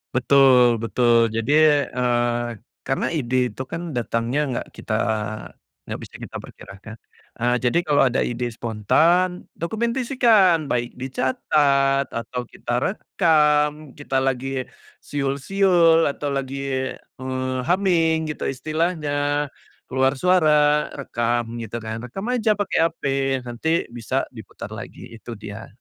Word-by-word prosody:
Betul 125 -3 +5
betul, 115 0 +3
jadi, 115 +5 -1 0.4
eee, 120 -1 0 0.4
karena 135 - 0
ide 130 -6 -2 0.2
itu - - -8
kan 170 0 -4
datangnya 120 +3 -1
nggak 120 - -3
kita 110 - -5 0.9
nggak - - -6
bisa - - -12
kita - - -9
perkirakan. 100 +3 -12 0.4
Eee, 120 +1 +1
jadi 125 +5 +2
kalau 145 -1 +4
ada 125 - 0
ide 120 0 -2
spontan, 160 - +1 0.2
dokumentasikan. 235 -2 +3
Baik 120 0 -1
dicatat 135 +1 +1
atau 115 +2 -4
kita 120 - -7
rekam. 150 -6 +1
Kita 135 -2 -2
lagi 135 0 -1 0.6
siul-siul, 165 +4 +2
atau 145 0 -4
lagi, 135 -1 -3 0.6
eee, 130 0 -3
humming 165 -4 +2
gitu - - -7
istilahnya, 155 +3 -2 0.8
keluar 130 +1 +2
suara, 150 -5 +4
rekam 120 -2 -1 0.2
gitu 115 -1 -6
kan. 110 0 -4
Rekam 195 - -6
aja 230 -3 +1
pakai 205 - -1
HP, 165 - -15 0.4
nanti 120 +6 -3 0.3
bisa 115 - -1
diputar - - -9
lagi. - - -10
Itu 115 +1 -9
dia. 105 +1 -9
135 Hz, 120 wpm, -22 LUFS, 120-165 Hz, 0.9 s, Betul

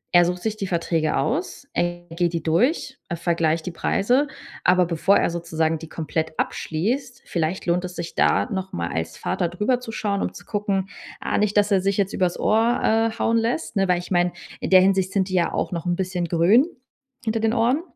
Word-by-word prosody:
Er 175 0 +7
sucht 180 +1 -2
sich 215 -1 -2
die 195 - -3
Verträge 165 -3 0
aus, 280 +1 -2
er 175 0 -1
geht 170 0 0
die 165 -2 -2
durch, 250 - +1
er 170 - -3
vergleicht 165 -2 0
die 180 - -3
Preise, 245 - +1 0.4
aber 180 0 +4
bevor 170 +4 +3
er - - +1
sozusagen 165 -1 -1
die 160 0 -10
komplett 160 0 -3
abschließt, 240 - -2
vielleicht 170 +2 -2
lohnt 175 +1 +1
es 180 0 -6
sich 170 0 -5
da - - +3
noch 190 -1 -4
mal 85 0 -2
als 80 0 -3
Vater 175 - -1
drüber 210 +8 0
zu 250 -2 -8
schauen, 205 -3 -1
um - - -1
zu - - -12
gucken: 200 -2 -1 0.3
„Ah - - -1
nicht, 210 0 +1
dass 205 0 +3
er 195 -2 +4
sich 195 0 0
jetzt 200 -1 0
übers 180 -2 0
Ohr, 225 +3 +2 0.3
äh, 225 - -11
hauen 230 +1 +2
lässt“, 235 +7 -2
ne, 195 -1 +2
weil 180 -1 +3
ich 175 +2 -7
meine, 175 -1 +2 0.3
in - - -3
der 185 -1 +8
Hinsicht 190 -1 +2
sind 195 -1 0
die - - -5
ja 175 -2 +2
auch - - -2
noch 175 0 -4
'n 175 - +1
bisschen 180 -1 -2
grün 175 - +4 0.6
hinter 225 0 0
den 225 0 +1
Ohren. 245 +6 +2
185 Hz, 215 wpm, -23 LUFS, 170-210 Hz, 0.6 s, der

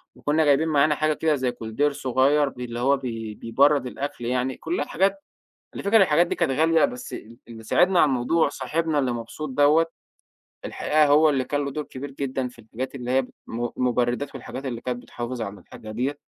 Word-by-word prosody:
وكنا 155 +1 +1
جايبين 145 +3 +3
معانا 150 0 +3
حاجة 155 +1 +1
كده 155 0 +1
زي 130 -2 -1
كولدير 120 +5 -1
صغير 140 +1 +2
بي 125 -1 -7
اللي 120 0 -6
هو 140 +3 +3
بي 115 -5 -5
بيبرد 140 +3 +2
الأكل 135 -2 -5
يعني، 125 +1 -1
كلّها 160 -3 -2
حاجات 190 +3 +2 0.6
على - - -5
الفكرة 200 +3 +2
الحاجات 170 0 +4
دي - - -2
كانت 135 - 0
غالية 160 -1 +4
بس 125 -2 -3
ال 115 +2 -9
اللي 115 -1 -10
ساعدنا 180 +8 +3
على 150 - +5
الموضوع 135 +5 +2
صاحبنا 150 +3 -1
اللي 130 -3 +1
مبسوط 120 +6 -6
دوّة، 145 +4 +4 0.8
الحقيقة 155 0 +2
هو 150 +2 +5
اللي 135 -2 0
كان 145 +2 -1
له 140 - -3
دور 150 +2 -4
كبير 135 +2 -8
جدًا 130 -2 -3
في 125 - -18
الحاجات 115 +4 -6
اللي 125 -2 -5
هي 130 +1 +3 0.2
م 120 +1 -3
مبردات 125 +2 0
والحاجات 135 +1 -7
اللي 120 -3 -4
كانت 125 -1 -4
بتحافظ 120 0 -6
على 100 -1 -6
الحاجه 110 - -11
ديّة. 135 +6 -2
135 Hz, 200 wpm, -24 LUFS, 125-150 Hz, 0.8 s, على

